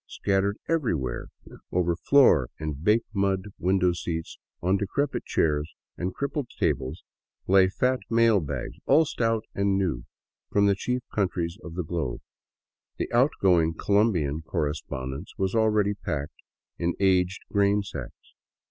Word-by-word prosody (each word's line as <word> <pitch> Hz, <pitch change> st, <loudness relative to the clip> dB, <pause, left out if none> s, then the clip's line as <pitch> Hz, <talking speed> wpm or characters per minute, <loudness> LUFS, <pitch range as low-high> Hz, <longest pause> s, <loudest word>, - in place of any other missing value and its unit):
Scattered 100 Hz, +1 st, 0 dB
everywhere, 85 Hz, -, -1 dB, 0.4 s
over 85 Hz, -1 st, +1 dB
floor 120 Hz, -, +4 dB
and 75 Hz, -1 st, -5 dB
baked 110 Hz, +3 st, +2 dB
mud 100 Hz, 0 st, 0 dB
window 90 Hz, -1 st, +2 dB
seats, 80 Hz, -1 st, -5 dB, 0.2 s
on 95 Hz, +3 st, +2 dB
decrepit 135 Hz, +9 st, -2 dB
chairs 75 Hz, 0 st, 0 dB, 0.2 s
and 90 Hz, +1 st, -3 dB
crippled 140 Hz, +3 st, -3 dB
tables, 70 Hz, 0 st, -1 dB, 0.4 s
lay 95 Hz, 0 st, +5 dB
fat 125 Hz, +6 st, +1 dB
mail 115 Hz, -2 st, +4 dB
bags, 70 Hz, -6 st, -4 dB
all 155 Hz, +4 st, +5 dB
stout 115 Hz, -5 st, -1 dB
and 100 Hz, -1 st, +1 dB
new, 80 Hz, -11 st, -1 dB, 0.5 s
from 100 Hz, 0 st, +3 dB
the 100 Hz, -, +4 dB
chief 125 Hz, +5 st, -2 dB
countries 90 Hz, -2 st, -1 dB
of 85 Hz, -1 st, -8 dB
the 90 Hz, -, -2 dB
globe. 80 Hz, -6 st, -3 dB, 0.8 s
The -, -, -3 dB
outgoing 95 Hz, -, +3 dB
Colombian 90 Hz, -9 st, +1 dB
correspondence 70 Hz, -4 st, -4 dB
was 95 Hz, -1 st, 0 dB
already 105 Hz, -2 st, +2 dB
packed 75 Hz, -7 st, -5 dB, 0.4 s
in 85 Hz, 0 st, 0 dB
aged 95 Hz, -1 st, +2 dB
grainsacks. 100 Hz, 0 st, -1 dB
95 Hz, 130 wpm, -26 LUFS, 80-105 Hz, 0.8 s, lay